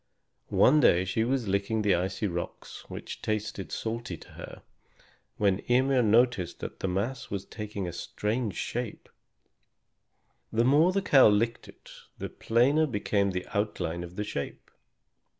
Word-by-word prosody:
One 150 Hz, +4 st, +5 dB
day 90 Hz, -9 st, +4 dB
she 105 Hz, +4 st, 0 dB
was 125 Hz, -1 st, 0 dB
licking 100 Hz, +3 st, 0 dB
the 100 Hz, -2 st, +4 dB
icy 95 Hz, +4 st, -1 dB
rocks, 85 Hz, -3 st, -5 dB
which -, -, -7 dB
tasted 110 Hz, -2 st, -3 dB
salty 115 Hz, -6 st, -4 dB
to -, -, -15 dB
her, -, -, -10 dB, 0.7 s
when 100 Hz, -2 st, +2 dB
Ymir 130 Hz, +1 st, +4 dB
noticed 115 Hz, -4 st, +2 dB
that -, -, -6 dB
the -, -, -2 dB
mass 100 Hz, +9 st, -2 dB
was 100 Hz, -1 st, -4 dB
taking 105 Hz, -3 st, -5 dB
a 85 Hz, -, -5 dB
strange 105 Hz, +5 st, -2 dB
shape. 120 Hz, -2 st, -4 dB, 1.4 s
The 115 Hz, +2 st, +2 dB
more 150 Hz, +7 st, +5 dB
the 195 Hz, +1 st, 0 dB
cow 140 Hz, -9 st, +7 dB
licked 110 Hz, +3 st, +1 dB
it, -, -, -15 dB, 0.3 s
the -, -, -5 dB
plainer 135 Hz, +7 st, +2 dB
became 105 Hz, -4 st, 0 dB
the 90 Hz, -1 st, -3 dB
outline 90 Hz, -5 st, -1 dB
of 90 Hz, +1 st, -10 dB
the 105 Hz, -, -2 dB
shape. 70 Hz, -9 st, -6 dB
105 Hz, 150 wpm, -28 LUFS, 95-120 Hz, 1.4 s, cow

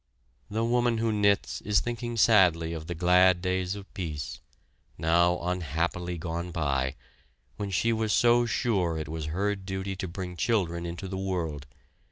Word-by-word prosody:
The 110 Hz, +2 st, -1 dB
woman 120 Hz, 0 st, +2 dB
who 115 Hz, 0 st, +1 dB
knits 100 Hz, -1 st, +1 dB
is 105 Hz, 0 st, +2 dB
thinking 120 Hz, 0 st, -4 dB
sadly 90 Hz, -7 st, +4 dB
of 80 Hz, -1 st, -6 dB
the 85 Hz, -, -4 dB
glad 90 Hz, +1 st, +5 dB
days 90 Hz, +1 st, -1 dB
of 100 Hz, -1 st, -11 dB
peace, 80 Hz, -6 st, -5 dB, 0.6 s
now 85 Hz, +2 st, +3 dB
unhappily 90 Hz, 0 st, -2 dB
gone 85 Hz, +1 st, -4 dB
by, 70 Hz, -6 st, -1 dB, 0.6 s
when 100 Hz, -1 st, -3 dB
she 115 Hz, +5 st, +1 dB
was 110 Hz, -1 st, 0 dB
so 120 Hz, +1 st, +4 dB
sure 95 Hz, -9 st, 0 dB
it 80 Hz, -, -4 dB
was 80 Hz, 0 st, -4 dB
her 100 Hz, +7 st, 0 dB
duty 95 Hz, 0 st, -4 dB
to 95 Hz, -, -3 dB
bring 90 Hz, 0 st, -6 dB
children 85 Hz, -6 st, 0 dB
into 85 Hz, +3 st, -6 dB
the 95 Hz, 0 st, -4 dB
world. 80 Hz, -7 st, -3 dB
90 Hz, 160 wpm, -28 LUFS, 85-105 Hz, 0.6 s, glad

